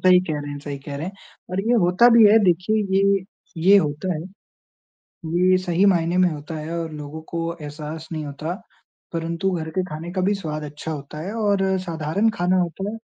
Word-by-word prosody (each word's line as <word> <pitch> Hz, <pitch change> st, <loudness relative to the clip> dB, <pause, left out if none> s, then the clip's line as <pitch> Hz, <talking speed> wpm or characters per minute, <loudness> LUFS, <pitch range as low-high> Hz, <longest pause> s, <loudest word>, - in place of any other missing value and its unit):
सही 180 Hz, -1 st, +7 dB
कह 150 Hz, -, -1 dB
रहे 145 Hz, -, -6 dB
हैं, 145 Hz, -, -5 dB
सही 140 Hz, -1 st, -6 dB
कह 140 Hz, +1 st, -7 dB
रहे 155 Hz, +5 st, -4 dB
हैं। 190 Hz, -, -5 dB, 0.4 s
और 185 Hz, +1 st, 0 dB
ये 230 Hz, +4 st, +1 dB
होता 180 Hz, +7 st, +5 dB
भी 230 Hz, -, +8 dB
है 215 Hz, +2 st, +7 dB
देखिए 185 Hz, +4 st, +2 dB, 0.2 s
ये, 195 Hz, -1 st, +3 dB, 0.3 s
ये 190 Hz, +5 st, +6 dB
होता 155 Hz, +3 st, -1 dB
है। 155 Hz, -, -4 dB, 1.1 s
ये 180 Hz, +3 st, +3 dB
सही 185 Hz, +1 st, +1 dB
मायने 175 Hz, -2 st, +3 dB
में 180 Hz, -1 st, +5 dB
होता 155 Hz, +1 st, -6 dB
है 155 Hz, +2 st, -4 dB
और 165 Hz, -1 st, -3 dB
लोगों 150 Hz, +1 st, -7 dB
को 170 Hz, -, -2 dB, 0.2 s
एहसास 150 Hz, +2 st, -7 dB
नहीं 155 Hz, -2 st, -3 dB
होता। 150 Hz, +4 st, -4 dB, 0.6 s
परंतु 170 Hz, +3 st, -1 dB
घर 165 Hz, -3 st, -3 dB
के 185 Hz, -, +2 dB
खाने 165 Hz, 0 st, -6 dB
का 185 Hz, -, -1 dB
भी 205 Hz, -, +3 dB
स्वाद 155 Hz, -5 st, -4 dB
अच्छा 150 Hz, +2 st, -7 dB
होता 150 Hz, +1 st, -7 dB
है 190 Hz, +6 st, -5 dB
और 205 Hz, -3 st, +1 dB, 0.2 s
साधारण 165 Hz, +6 st, 0 dB
खाना 180 Hz, 0 st, +2 dB
होता 185 Hz, +4 st, -2 dB
है। 225 Hz, -, -6 dB
170 Hz, 205 wpm, -22 LUFS, 155-185 Hz, 1.1 s, भी